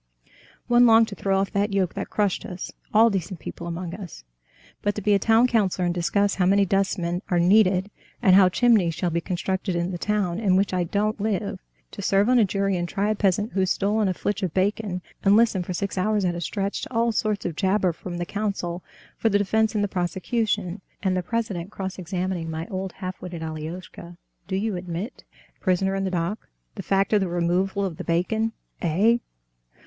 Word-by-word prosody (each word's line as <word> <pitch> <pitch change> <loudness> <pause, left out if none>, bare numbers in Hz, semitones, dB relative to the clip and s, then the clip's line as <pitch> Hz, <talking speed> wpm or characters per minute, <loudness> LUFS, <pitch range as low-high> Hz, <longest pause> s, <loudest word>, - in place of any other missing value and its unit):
One 240 0 +5
longed 225 0 +6
to 200 - -7
throw 195 0 0
off 195 0 0
that 200 0 0
yoke 190 -3 +1
that 195 - -5
crushed 205 -3 0
us, 180 0 -6 0.2
all 225 +2 +5
decent 185 -2 -3
people 170 - -7
among 170 0 -4
us. 185 - -9 0.6
But 205 0 0
to 210 - -3
be 210 - +3
a 200 - +4
town 225 +4 +4
councilor 200 -7 +1
and 175 - +1
discuss 185 +4 +1
how 180 -2 +1
many 200 +1 +4
dustmen 185 -2 0
are 175 - +2
needed, 190 +1 +4 0.3
and 185 -1 +5
how 190 -1 +7
chimneys 200 -6 +3
shall 175 0 -1
be 170 +1 0
constructed 185 +1 -2
in 170 +2 -1
the 175 - -5
town 200 -3 0
in 195 -5 +2
which 195 0 +2
I 180 -1 +1
don't 210 +4 -1
live—to 200 -1 -4
serve 200 +3 +2
on 250 -1 +5
a 220 - +5
jury 195 -1 0
and 175 0 -3
try 205 +1 0
a - - 0
peasant 205 +2 +1
who's 190 -1 +1
stolen 210 +1 +1
a 185 - 0
flitch 205 +2 -2
of 180 -5 -2
bacon, 190 -1 0 0.2
and 200 +1 +5
listen 225 -5 +3
for 180 - -5
six 195 +1 -2
hours 210 +1 +1
at 175 - +1
a 170 - -5
stretch 195 +4 -2
to - - -7
all 230 -1 +2
sorts 215 -1 -1
of 170 - -2
jabber 190 -1 +1
from 175 +2 -7
the 175 - -2
counsel 195 -4 -3 0.3
for 225 - +2
the 205 - +3
defense 220 +2 +1
and 205 - +2
the - - +1
prosecution, 190 +1 -1 0.2
and 190 -2 +1
the 185 - 0
president 195 -3 -3
cross 190 -2 -5
examining 180 -1 -3
my 160 +1 -4
old 190 0 -3
half 185 -1 -6
witted 175 -3 -6
Alioshka, 165 +2 -7 0.3
'Do 190 - -2
you 205 +1 -1
admit, 180 +6 -6 0.3
prisoner 190 0 +1
in 195 0 -1
the - - 0
dock, 180 +4 -3 0.3
the - - -6
fact 195 +2 +1
of 210 - +4
the 190 - 0
removal 180 +3 0
of 170 -4 -4
the - - -5
bacon?' 220 +7 0 0.3
'Eh? 200 +8 +3
195 Hz, 210 wpm, -24 LUFS, 180-210 Hz, 0.6 s, how